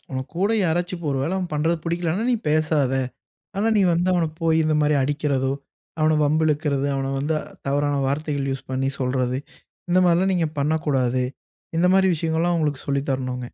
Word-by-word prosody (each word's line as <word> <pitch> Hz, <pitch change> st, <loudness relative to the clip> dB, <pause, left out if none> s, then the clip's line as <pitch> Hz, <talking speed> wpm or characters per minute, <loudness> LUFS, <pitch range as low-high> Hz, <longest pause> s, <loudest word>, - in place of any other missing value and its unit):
உன் 130 Hz, 0 st, -2 dB
கூட 195 Hz, +5 st, +1 dB
யாராச்சும் 175 Hz, 0 st, -1 dB
ஒரு 135 Hz, -, 0 dB
வேளை 160 Hz, +6 st, -1 dB
அவன் 185 Hz, -2 st, -3 dB
பண்றது 160 Hz, +3 st, +1 dB
புடிக்கலன்னா 170 Hz, +4 st, -1 dB
நீ -, -, +3 dB
பேசாத. 155 Hz, -3 st, +2 dB, 0.7 s
ஆனா 210 Hz, +3 st, +1 dB
நீ -, -, +4 dB
வந்து 175 Hz, +2 st, +1 dB
அவன 170 Hz, -2 st, +2 dB
போயி 160 Hz, -1 st, +3 dB
இந்த 155 Hz, 0 st, +2 dB
மாரி 150 Hz, 0 st, +3 dB
அடிக்கிறதோ, 140 Hz, -2 st, 0 dB, 0.5 s
அவன 155 Hz, 0 st, +3 dB
வம்பு 155 Hz, +2 st, +2 dB
இழுக்கிறது, 145 Hz, -2 st, 0 dB
அவன 135 Hz, 0 st, -2 dB
வந்து 150 Hz, +3 st, 0 dB, 0.3 s
தவறான 145 Hz, +1 st, +1 dB
வார்த்தைகள் 140 Hz, -1 st, -1 dB
யூஸ் 135 Hz, -, -6 dB
பண்ணி 135 Hz, +1 st, 0 dB
சொல்றது, 125 Hz, -1 st, 0 dB, 0.5 s
இந்த 180 Hz, -, +5 dB
மாரிலாம் 180 Hz, +3 st, +3 dB
நீங்க 170 Hz, -3 st, +1 dB
பண்ணக்கூடாது. 140 Hz, -4 st, +1 dB, 0.5 s
இந்த 175 Hz, +2 st, +4 dB
மாரி 190 Hz, 0 st, +4 dB
விஷயங்கள்லாம் 165 Hz, +2 st, 0 dB
அவுங்களுக்கு 150 Hz, -4 st, -1 dB
சொல்லி 140 Hz, -1 st, 0 dB
தரணுங்க. 130 Hz, -1 st, -2 dB
155 Hz, 170 wpm, -23 LUFS, 135-170 Hz, 0.7 s, இந்த